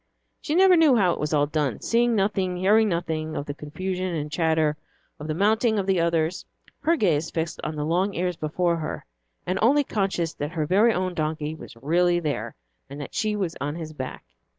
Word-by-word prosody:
She 305 - -2
never 375 0 +6
knew 315 -6 +5
how 190 -6 +3
it - - -6
was 150 - -2
all 145 -2 +3
done, 145 -3 -1
seeing 235 0 +2
nothing, 195 -3 0
hearing 210 +4 +4
nothing 160 -3 -2
of 145 - -3
the 145 - -4
confusion 185 +5 -4
and 150 -1 -4
chatter, 160 -2 +1 0.4
of 150 - -6
the 155 - -2
mounting 220 +4 +2
of 195 - 0
the 190 -2 +2
others, 165 0 0 0.4
her 325 +3 +2
gaze 165 - +1
fixed 165 0 -3
on 155 - -3
the 150 0 -2
long 185 +5 0
ears 180 0 -1
before 170 +3 0
her, 155 -2 -5 0.4
and 185 +2 -1
only 280 +6 +4
conscious 195 - -1
that 150 +3 -5
her 155 -3 -1
very 205 +8 +4
own 185 -3 -1
donkey 155 -1 -2
was 160 - -11
really 175 +8 +2
there, 150 -4 -3 0.3
and 140 +1 -8
that 145 - -7
she 215 -2 0
was 185 -5 -2
on 145 +2 -2
his 160 -2 -7
back. 130 -3 -7
170 Hz, 205 wpm, -25 LUFS, 155-195 Hz, 0.4 s, never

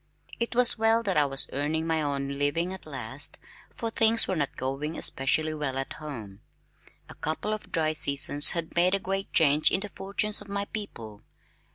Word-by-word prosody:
It 235 0 -3
was 245 -2 +7
well 225 +1 +2
that 195 -4 -1
I 150 -2 +2
was 135 0 0
earning 150 +3 -2
my 160 -1 -1
own 140 -2 -3
living 165 +6 -1
at 190 - -11
last, - - 0 0.4
for 230 -1 -5
things 225 +1 +3
were 185 - -2
not 145 -4 -3
going 135 +5 -4
especially 155 +4 0
well 145 -4 -4
at 135 - -5
home. 115 -10 -9 0.7
A - - -12
couple 160 +7 -4
of 215 - -8
dry 155 -2 0
seasons 145 -1 +6
had 165 -1 -4
made 180 +2 +2
a - - -3
great 195 +1 -5
change 150 -1 +3
in 190 - -1
the 205 - -6
fortunes 200 +2 -1
of 205 - -13
my 200 0 -4
people. 115 - -9
160 Hz, 190 wpm, -26 LUFS, 145-200 Hz, 0.7 s, was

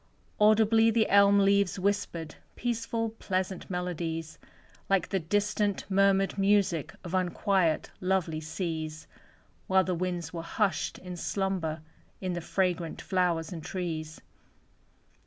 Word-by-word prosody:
Audibly 220 +1 +5
the 225 -1 +2
elm 200 0 +6
leaves 200 -1 +3
whispered 185 -5 -1 0.2
Peaceful, 230 -1 -2
pleasant 185 -1 -2
melodies, 170 -3 -3 0.5
Like 195 -3 +2
the 195 - 0
distant 205 +3 0
murmured 195 0 +3
music 195 -6 +2
Of 175 -1 -7
unquiet, 185 -2 +1
lovely 185 -4 0
seas: 160 -1 -4 0.6
While 190 0 +4
the 185 - -1
winds 175 -2 -3
were 170 - -4
hushed 195 +4 -1
in 180 -1 -8
slumber 180 -4 -2 0.4
In 185 -1 -2
the 175 - -3
fragrant 175 -1 -1
flowers 180 -2 0
and 165 -3 -7
trees. 160 -4 -4
185 Hz, 120 wpm, -29 LUFS, 165-200 Hz, 0.6 s, elm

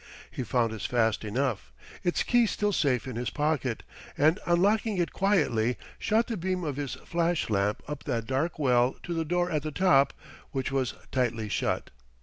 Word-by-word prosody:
He - - -4
found 120 -2 +1
this 110 - -4
fast 115 -3 +1
enough, 120 +1 -2 0.3
its 175 - +1
key 240 -2 +4
still 210 0 0
safe 135 -8 +1
in 130 -3 -5
his 120 -2 -1
pocket, 145 -6 -1 0.3
and 155 +7 +4
unlocking 200 +4 +2
it 175 -1 0
quietly, 145 - +2 0.2
shot 220 +2 +2
the 230 -3 -3
beam 185 +1 -2
of 145 -4 -2
his 145 -3 -3
flash 170 -6 0
lamp 100 +1 +1
up 150 -1 -6
that 115 -5 -1
dark 135 +7 -1
well 125 -3 +3
to 175 - -3
the 165 -1 0
door 175 +2 0
at 155 -2 0
the 155 - -3
top; 140 -4 +4 0.4
which 135 0 -2
was 130 -2 0 0.2
tight 125 -3 +1 0.2
shut. - - -1
145 Hz, 180 wpm, -28 LUFS, 125-175 Hz, 0.4 s, key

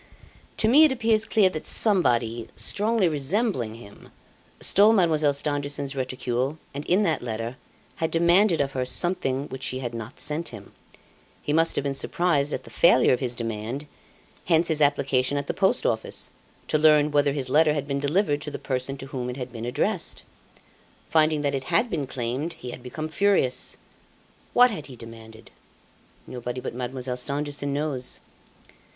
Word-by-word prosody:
"To 220 - +2
me 280 +7 +7
it 310 - +5
appears 225 -3 +2
clear 215 -3 +4
that 155 - -6
somebody, 120 - +1
strongly 215 -1 +1
resembling 150 - -1
him, 105 -3 -14 0.5
stole 210 +3 +5
Mademoiselle 160 -7 +3
Stangerson's 145 -1 -2
reticule 130 +2 -2 0.2
and 140 +1 -5
in 190 +4 +3
that 160 -6 0
letter, 115 +1 -4 0.4
had 160 - -1
demanded 170 +1 +3
of 140 -1 -1
her 130 -1 -2
something 140 -1 -1
which 130 - -7
she 130 - -2
had 120 -2 -4
not 115 +3 -7
sent 155 +3 -1
him. 105 -4 -11 0.7
He 145 - -1
must 165 +1 +3
have - - 0
been 140 -1 -1
surprised 150 0 0
at 130 - -3
the - - -13
failure 170 -8 +5
of 125 - 0
his 125 -2 -2
demand, 115 +4 -4 0.6
hence 170 0 +2
his 155 -1 -1
application 140 -1 +2
at 140 - -2
the - - -2
Post 200 - +1
Office, - - 0 0.4
to 155 - +1
learn 150 -1 +5
whether 145 -1 +2
his 135 -3 -2
letter 150 +3 +4
had 145 -2 -2
been 140 -1 -2
delivered 145 +1 +1
to 150 - -5
the - - -5
person 130 +1 -3
to 135 - -8
whom 130 -3 -5
it 125 - -6
had 125 -1 -6
been 115 -1 -6
addressed. 165 - -2 0.9
Finding 155 -2 +3
that 140 -1 0
it 135 -1 -3
had 180 +8 +1
been 150 -5 -2
claimed, 130 +6 -3
he 125 - -8
had - - -9
become 155 +5 -5
furious. 160 -6 0 0.8
What 245 0 +6
had 155 -10 -6
he 130 - -10
demanded? 115 -1 -12 0.7
Nobody 125 0 -5
but - - -5
Mademoiselle 125 0 -4
Stangerson 145 +2 -2
knows. 140 -3 -2
145 Hz, 170 wpm, -25 LUFS, 125-165 Hz, 0.9 s, me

